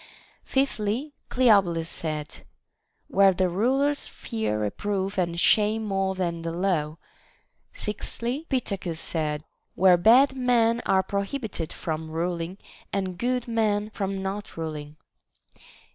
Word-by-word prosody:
Fifthly, 265 Hz, +1 st, 0 dB, 0.2 s
Cleobulus 195 Hz, -10 st, +4 dB
said, 155 Hz, -3 st, -4 dB, 0.6 s
Where 195 Hz, 0 st, +5 dB
the 185 Hz, 0 st, +2 dB
rulers 270 Hz, +10 st, +1 dB
fear 220 Hz, -, -3 dB
reproof 195 Hz, -, -2 dB
and 170 Hz, -1 st, 0 dB
shame 215 Hz, +3 st, +3 dB
more 195 Hz, -2 st, 0 dB
than 170 Hz, -3 st, -2 dB
the 165 Hz, 0 st, -3 dB
law. 165 Hz, -4 st, 0 dB, 0.7 s
Sixthly, 240 Hz, +7 st, -4 dB
Pittacus 195 Hz, -, -2 dB
said, 155 Hz, -3 st, -2 dB, 0.3 s
Where 185 Hz, -1 st, +6 dB
bad 250 Hz, +9 st, +6 dB
men 240 Hz, -2 st, +3 dB
are 190 Hz, 0 st, +4 dB
prohibited 200 Hz, -, -3 dB
from 160 Hz, -1 st, -4 dB
ruling, 170 Hz, +2 st, -2 dB, 0.3 s
and 190 Hz, -2 st, -2 dB
good 250 Hz, 0 st, 0 dB
men 215 Hz, -2 st, 0 dB
from 195 Hz, -2 st, -3 dB
not 200 Hz, 0 st, -5 dB
rul 160 Hz, -1 st, -3 dB
ing. 150 Hz, 0 st, -9 dB
195 Hz, 115 wpm, -26 LUFS, 170-225 Hz, 0.7 s, Where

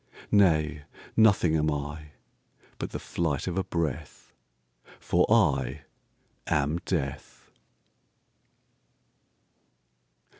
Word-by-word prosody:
Nay, 75 Hz, -7 st, +3 dB, 0.3 s
nothing 100 Hz, -7 st, +4 dB
am 75 Hz, 0 st, +2 dB
I,But 75 Hz, +1 st, -8 dB
the -, -, -5 dB
flight 80 Hz, -5 st, -2 dB
of 90 Hz, -, -3 dB
a 95 Hz, -, 0 dB
breath—For 65 Hz, -7 st, -4 dB
I 65 Hz, +2 st, +2 dB, 0.6 s
am 75 Hz, +2 st, +1 dB
Death! 70 Hz, -7 st, -4 dB
75 Hz, 70 wpm, -27 LUFS, 70-85 Hz, 0.6 s, nothing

